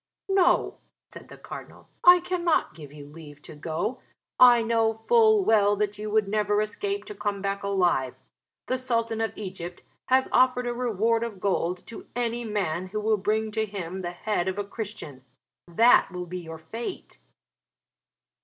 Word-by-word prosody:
"No," 385 -2 +2 0.3
said - - -12
the - - -13
Cardinal, - - -11 0.2
"I 355 0 +8
cannot 350 - 0
give 150 -3 -12
you 145 -1 -11
leave 150 0 -13
to - - -11
go. 160 - -4 0.4
I 240 -2 +7
know 225 -1 0
full 435 -4 +5
well 205 -2 +4
that 205 0 -2
you 215 0 -4
would 215 -1 +2
never 210 0 +1
escape 395 - -3
to 420 - -8
come 205 - -3
back 200 0 -2
alive. 175 -10 +1 0.5
The 255 - -1
Sultan 230 -3 -1
of 225 -1 -3
Egypt 185 -3 -7 0.2
has 260 0 +3
offered 250 -1 +3
a 240 - -1
reward 230 -1 0
of 220 -5 -6
gold 185 -2 -1
to 230 - -10
any 240 0 -2
man 185 -5 -2
who 215 +3 -4
will 215 +1 +2
bring 215 +2 -1
to 220 0 0
him 190 -2 -6
the 175 - -3
head 175 +1 -2
of 190 +1 -2
a 205 - -1
Christian. 200 - -7 0.4
That 225 +8 +4
will 180 -1 -5
be 180 +1 -6
your 165 -2 -8
fate." 225 - -7
210 Hz, 170 wpm, -26 LUFS, 185-235 Hz, 0.5 s, I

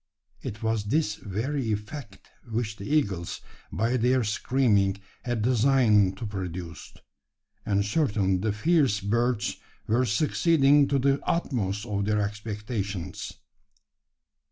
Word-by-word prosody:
It 105 +2 -6
was 110 -2 0
this 125 0 +1
very 115 +6 -3
effect 105 +1 -6 0.2
which 110 -1 -2
the 100 - -7
eagles, 100 - 0 0.3
by 115 +8 0
their 125 +1 +2
screaming, 105 -3 +2 0.3
had 120 -3 -1
designed 115 -6 +4
to 115 - -5
produce; 90 -4 -6 0.8
and 100 -1 +2
certainly 100 - +1
the 105 +4 0
fierce 135 -1 +2
birds 115 +3 0 0.3
were 120 +4 +2
succeeding 145 - +4
to 140 - +1
the 135 +1 +2
utmost 110 - -1
of 100 -3 -2
their 105 0 +1
expectations. 105 -2 -4
110 Hz, 115 wpm, -27 LUFS, 100-130 Hz, 0.8 s, designed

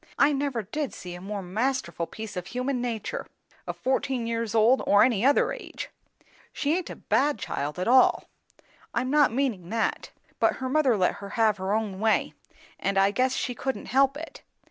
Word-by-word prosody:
I 290 +1 +4
never 275 -5 -1
did 280 +8 -4
see 180 -1 -8
a 175 - -9
more 200 +1 -5
masterful 220 -1 -2
piece 220 -2 -8
of 180 0 -5
human 250 +4 -2
nature, 230 -4 -3 0.4
of - - -4
fourteen 260 -2 -1
years 230 -1 -2
old 230 +4 +5
or 205 0 +6
any 235 -4 +2
other 280 +2 +4
age. - - -8 0.6
She 300 +1 0
aint 365 -1 -3
a - - -6
bad 290 -3 +1
child 150 -6 -4
at 180 - -2
all; 255 +2 +5 0.7
I'm 255 +1 0
not 295 -4 +5
meaning 230 -9 -1
that; 225 +1 -1 0.3
but - - +3
her 260 0 -4
mother 270 -5 +3
let 185 -2 +1
her 200 - -7
have 220 -2 +3
her 190 +1 -3
own 210 -3 -1
way, 220 0 +1 0.5
and 195 0 -1
I 195 +1 +4
guess 255 +4 +1
she 250 - -2
couldn't 265 +2 -4
help 275 +1 +4
it. 325 +2 -9
230 Hz, 190 wpm, -26 LUFS, 200-265 Hz, 0.7 s, or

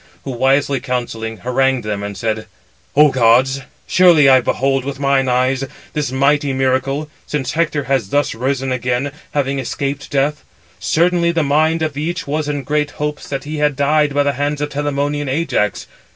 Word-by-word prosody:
Who 135 - -5
wisely 135 +2 +2
counselling, 115 -3 -4
harangued 130 0 +1
them, 105 -1 -3
and 100 0 -5
said: 110 -1 -2 0.5
"O 150 +1 +7
gods, 130 +2 +3 0.2
surely 175 -6 +5
I 130 -1 +6
behold 135 +2 0
with 135 0 -5
mine 140 -2 +2
eyes 130 +2 +1 0.3
this 150 -4 -2
mighty 140 +1 +2
miracle, 135 +3 0 0.2
since 145 -4 -2
Hector 155 -2 0
has 130 -6 -1
thus 145 +4 +1
risen 130 +2 -2
again, 125 +2 -1 0.2
having 140 -1 0
escaped 135 +2 -3
death. 145 +2 0 0.4
Certainly 170 0 +2
the 165 -2 +1
mind 155 +3 +2
of 155 -3 -2
each 170 +4 -3
was 150 +1 -2
in 145 -2 -2
great 150 +2 0
hopes 150 0 -4
that 135 -1 -3
he 150 +1 -5
had 150 -1 +1
died 145 +1 +2
by 145 - +3
the 140 0 +1
hands 145 +2 -2
of 150 0 -2
Telamonian 145 0 -2
Ajax. 130 - -1
140 Hz, 170 wpm, -18 LUFS, 130-150 Hz, 0.5 s, O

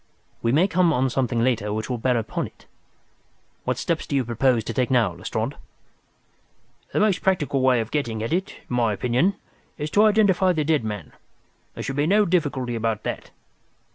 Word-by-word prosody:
We 115 - +1
may 160 +8 +4
come 180 -2 +3
on 130 -3 +1
something 120 -3 0
later 115 -5 0
which 110 +1 -3
will 125 -2 -3
bear 125 +1 +1
upon 110 -1 -2
it. - - -20 1.0
What - - 0
steps - - -2
do - - -2
you 135 -2 +1
propose 120 0 +1
to - - -4
take 125 -2 0
now, 125 -4 +3
Lestrade?" - - -3 1.4
"The - - 0
most 210 -3 +2
practical 150 -8 +1
way 130 -2 +4
of 110 - -6
getting 115 -7 -2
at 115 - -2
it, 185 +2 0 0.2
in 125 - -3
my 115 -3 +2
opinion, 125 - +1 0.4
is 150 +1 -4
to 210 +5 +5
identify 200 -4 +4
the 155 -2 0
dead 150 -3 +1
man. 105 -2 -5 0.6
There - - -5
should 135 +1 -4
be 145 +1 +2
no 210 +3 +4
difficulty 145 -9 0
about 115 -2 -2
that. - - -5
130 Hz, 190 wpm, -24 LUFS, 115-170 Hz, 1.4 s, to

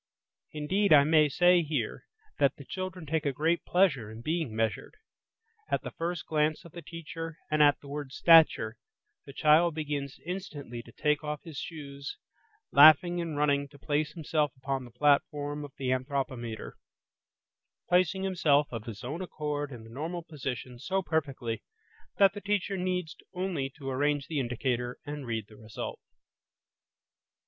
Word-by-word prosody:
Indeed, 185 +7 0
I 145 -2 +8
may 155 0 +4
say 175 +4 +5
here, 150 -8 -3 0.3
that - - +3
the - - -12
children 185 -3 -5
take 155 +1 -1
a 145 - +1
great 160 +5 0
pleasure 175 - +2
in 110 +1 -10
being 155 -7 -1
measured; 110 - -2 0.7
at - - 0
the - - -5
first 175 +1 -3
glance 155 0 0
of 170 - -12
the 170 - -8
teacher 165 -1 -7
and 155 0 +3
at 145 -1 +5
the 140 - -12
word 145 -1 -5
stature, 155 -9 +5 0.5
the 140 - -9
child 155 +3 +4
begins 145 -3 -3
instantly 150 -10 -6
to 120 - -15
take 150 +4 0
off 150 -1 -4
his 160 -5 -7
shoes, 140 -4 -7 0.5
laughing 155 +5 +7
and 165 -3 -4
running 140 -1 +2
to 145 +1 -17
place 150 +1 -1
himself 155 -2 0
upon 130 0 -3
the - - -12
platform 145 +3 +1
of 145 -2 -9
the 130 -2 -1
anthropometer; 130 -3 -3 1.1
placing 185 +1 +2
himself 155 -7 +3
of 115 -2 -5
his 110 -3 -8
own 145 +8 -4
accord 150 -4 -3
in 120 -3 -9
the 115 - -13
normal 165 +6 -4
position 130 -6 -6
so 190 +8 -1
perfectly 135 -9 -2 0.6
that 195 -1 +6
the 205 - -7
teacher 205 -1 0
needs 180 -3 -2 0.2
only 180 -7 -2
to 135 0 -11
arrange 145 +1 +1
the 155 -3 -2
indicator 125 0 -2
and 145 -3 -6
read 115 -2 -2
the 105 - -16
result. 110 -1 -6
150 Hz, 160 wpm, -29 LUFS, 135-165 Hz, 1.1 s, I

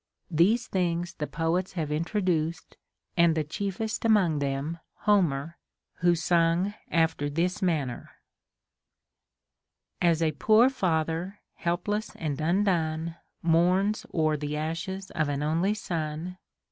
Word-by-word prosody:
These 200 +10 +3
things 175 -3 -1
the 150 - -4
poets 170 +3 -1
have 160 -5 -3
introduced, 170 0 -1 0.4
and 170 -2 +4
the 155 - +1
chiefest 200 +7 -3
among 195 -9 +3
them, 140 +4 -2 0.2
Homer, 170 -6 +1 0.4
who 175 0 +3
sung 170 +3 +2 0.2
after 160 -3 +1
this 180 +7 -1
manner: 155 -9 -1 1.2
— 175 -1 -4
As 165 0 +1
a 160 - +2
poor 220 - +4
father, 170 -2 -1 0.2
helpless 205 +5 -2
and 155 -2 -3
undone, 165 -2 0 0.3
Mourns 180 +5 +2
o'er 155 -2 +1
the 150 +1 -3
ashes 165 +5 -4
of 155 -2 0
an 145 0 -1
only 170 +7 +1
son. 170 -1 -4
170 Hz, 120 wpm, -27 LUFS, 155-185 Hz, 1.2 s, and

